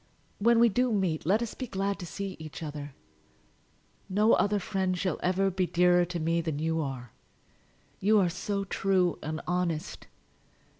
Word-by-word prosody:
When 230 +2 +4
we 235 - +7
do 245 +3 +1
meet 185 -7 0
let 210 +6 +3
us 230 - -5
be 255 - -6
glad 200 -1 -2
to 175 - -6
see 195 +4 -5
each 155 +1 -8
other. 145 -2 -6 1.1
No 210 +4 +4
other 205 0 +3
friend 190 -2 -1
shall 185 0 -1
ever 190 +2 +1
be 185 0 0
dearer 175 0 +4
to 175 0 -4
me 165 +1 +1
than 160 -3 -3
you 160 +1 0
are. 130 -5 -5 0.9
You 215 +3 +4
are 185 - +3
so 200 +3 -2
true 185 -2 +1
and 155 +1 -4
honest! 175 -1 -2
180 Hz, 165 wpm, -29 LUFS, 165-200 Hz, 1.1 s, we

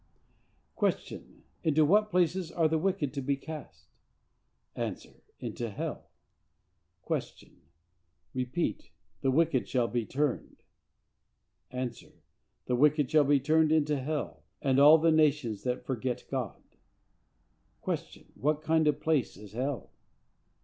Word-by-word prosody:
Q. - - -2 0.2
Into 155 -2 +4
what 210 +6 +4
place 180 -1 +1
are 165 -2 +2
the 160 0 +1
wicked 160 -6 -1
to 140 - -3
be 140 +1 0
cast?—A. 155 +1 -9 0.4
Into 120 -1 -4
hell. 100 - -5 1.0
Q. - - -4 0.8
Repeat 130 0 -2 0.3
"The 135 - +2
wicked 150 -1 +2
shall 125 -3 +1
be 120 0 -1
turned."—A. 130 -2 -6 0.7
"The 125 - 0
wicked 145 +1 +3
shall 155 -2 +5
be 145 0 +4
turned 155 +3 +3
into 150 -2 +2
hell, 150 +3 -3 0.2
and 135 -1 +2
all 150 +3 +9
the 165 +1 +3
nations 140 -9 +2
that 125 0 -2
forget 125 -1 -3
God." 130 -3 -3 1.3
Q. - - -4
What 150 +2 -1
kind 160 -1 +3
of 150 - +4
a - - -20
place 150 -8 0
is 105 -1 -12
hell? 130 +3 -3
145 Hz, 120 wpm, -30 LUFS, 130-155 Hz, 1.3 s, all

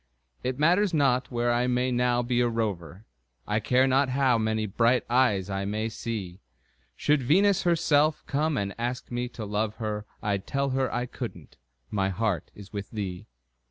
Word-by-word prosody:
It 130 0 -2
matters 175 +5 +3
not 130 -3 +2
where 120 0 0
I 120 +1 +1
may 125 +1 +1
now 125 0 +2
be 120 0 +1
a 120 - +2
rover, 105 -4 -3 0.4
I 105 +1 0
care 125 +4 +3
not 135 +1 +3
how 130 -2 +2
many 110 0 0
bright 115 +5 +2
eyes 120 -7 +3
I 95 -1 -2
may 110 +2 -2
see; 105 -5 -5 0.6
Should 150 -1 +2
Venus 190 +9 +3
herself 155 -3 +2
come 150 +1 0
and 100 -2 -2
ask 120 +1 -3
me 120 0 -2
to 120 -3 -7
love 105 +1 -1
her, 105 -1 -4 0.2
I'd 100 -2 -1
tell 140 0 0
her 130 0 0
I 120 0 -1
couldn't - - -8 0.3
my 95 -2 +1
heart 95 -4 -1
is 100 0 -12
with 100 -1 -5
thee. 95 -5 -5
120 Hz, 175 wpm, -27 LUFS, 105-130 Hz, 0.6 s, matters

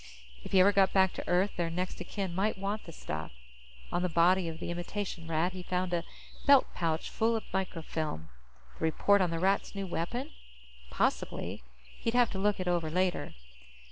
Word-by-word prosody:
If - - -9
he 190 - +5
ever 200 +2 +6
got 195 -1 +4
back 190 -1 +4
to - - -6
Earth, 180 +4 +2
their 170 -1 0
next 180 +2 -3
of 180 - -6
kin 195 -4 -3
might 195 +4 0
want 200 +2 -3
the 165 - -8
stuff. 80 - -6 0.6
On 175 - 0
the 180 - 0
body 175 +2 +4
of 160 0 -7
the 175 - -4
imitation 175 0 -4
Rat, 165 +3 +1
he 185 - -6
found 180 0 -2
a 170 -1 +1 0.4
belt 280 -2 +8
pouch 165 -2 -1
full 230 +1 +2
of 220 - -2
microfilm. 160 - -3 0.5
The - - 0
report 200 +5 +3
on 180 - +2
the 165 - -2
Rats' 195 +4 +1
new 195 -1 -3
weapon? 190 - -3 0.6
Possibly. - - -1 0.4
He'd 230 +1 -1
have 245 -2 +4
to 190 - -3
look 205 0 +1
it 185 - -3
over 170 -3 +1
later. 180 +2 0
180 Hz, 195 wpm, -31 LUFS, 170-195 Hz, 0.6 s, belt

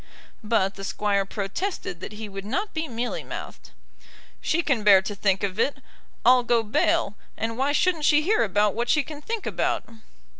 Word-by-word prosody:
But 210 -3 +1
the 195 - -7
Squire 200 0 0
protested 200 - -4
that 190 - -7
he 215 0 -6
would 195 -1 -7
not 380 - -2
be 315 0 -2
mealy 240 -1 -3
mouthed. - - -8 0.7
"She 340 +2 +1
can 255 -9 +1
bear 195 -2 +7
to 205 - -4
think 195 -1 +1
of 195 +1 -2
it, 280 +4 +1 0.5
I'll 250 +1 +7
go 235 -1 +2
bail; 210 -1 +1 0.2
and 225 0 -2
why 270 +4 +1
shouldn't 320 0 +2
she 300 0 +5
hear 425 +6 +2
about 205 0 +2
what 235 +2 -2
she 300 - +3
can 300 0 -9
think 450 +5 -4
about?" - - -1
225 Hz, 185 wpm, -25 LUFS, 200-295 Hz, 0.7 s, bear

